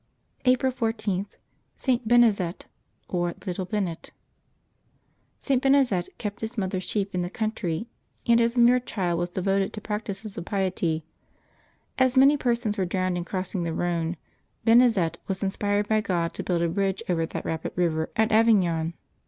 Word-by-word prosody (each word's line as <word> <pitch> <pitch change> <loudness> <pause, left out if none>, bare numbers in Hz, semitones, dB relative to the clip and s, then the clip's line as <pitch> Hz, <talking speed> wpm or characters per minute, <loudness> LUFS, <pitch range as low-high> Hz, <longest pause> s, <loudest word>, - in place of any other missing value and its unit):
April 255 +1 +3
14.— 215 -5 -2 0.5
ST. 250 -4 0
BENEZET, 215 -7 +3 0.4
or 175 -1 -1
Little 185 0 -3
Bennet. 185 -3 -3 1.3
^T. 265 -3 +1
Benezet 265 -10 +3
kept 205 -1 -5
his 225 +2 -5
mother's 190 -2 -1
sheep 200 -2 -2
in 180 - 0
the 175 - -2
country, 215 -3 -2 0.4
and 235 0 +5
as 235 +1 +1
a - - +1
mere 240 +1 +6
child 180 -8 -2
was 175 0 -1
devoted 195 +2 0
to 215 - -5
practices 210 -1 -5
of - - -7
piety. 180 -6 -1 0.9
As 260 0 +3
many 275 +3 +7
persons 235 -6 -1
were 190 - +2
drowned 185 0 -1
in 175 -1 -3
crossing 185 +1 -3
the 165 -1 -2
Rhone, 170 -1 -1 0.5
Benezet 225 -8 +4
was 195 +1 -2
inspired 205 +1 0
by 215 0 +2
God 170 -5 -1
to - - -5
build 175 -2 0
a - - +2
bridge 195 +2 -1
over 165 -2 0
that - - -6
rapid 160 0 -3
river 160 -3 0
at 220 +1 +2
Avignon. 180 -7 +3
195 Hz, 160 wpm, -26 LUFS, 175-225 Hz, 1.3 s, many